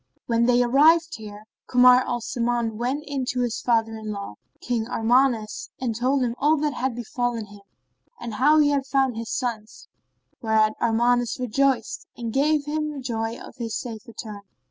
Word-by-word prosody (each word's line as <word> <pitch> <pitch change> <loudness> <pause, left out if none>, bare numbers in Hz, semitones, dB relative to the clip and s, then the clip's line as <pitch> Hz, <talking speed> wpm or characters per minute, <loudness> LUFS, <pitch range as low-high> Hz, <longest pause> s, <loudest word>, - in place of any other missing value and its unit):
And - - -43
when 235 0 +2
they 245 0 +4
arrived 315 +5 +4
there, 210 -1 -10 0.2
Kamar 250 0 +6
al 240 -1 -2
Zaman 235 -1 -1
went 260 +5 -2
in 280 -2 -3
to 250 0 -1
his 240 -2 -2
father 225 -2 +1
in 220 -1 -7
law, 200 - -6 0.3
King 235 -2 -2
Armanus, 235 -2 +1
and 240 -4 -2
told 255 +3 +1
him 235 -2 -1
all 305 +2 +3
that 295 0 -1
had 255 -1 -2
befallen 240 -1 -3
him 205 0 -15 0.6
and 235 -2 -6
how 290 +8 +4
he 295 -1 +5
had 275 -1 -1
found 265 -2 +1
his 225 0 -5
sons; 230 -3 -4 0.5
whereat 220 -1 +2
Armanus 240 +2 +1
rejoiced 255 -1 0
and 230 -2 -5
gave 295 +1 +2
him 300 -2 -3
joy 225 -1 -3
of - - -12
his 230 -2 -4
safe 235 0 -7
return. 215 -3 -8
240 Hz, 175 wpm, -24 LUFS, 225-265 Hz, 0.6 s, Kamar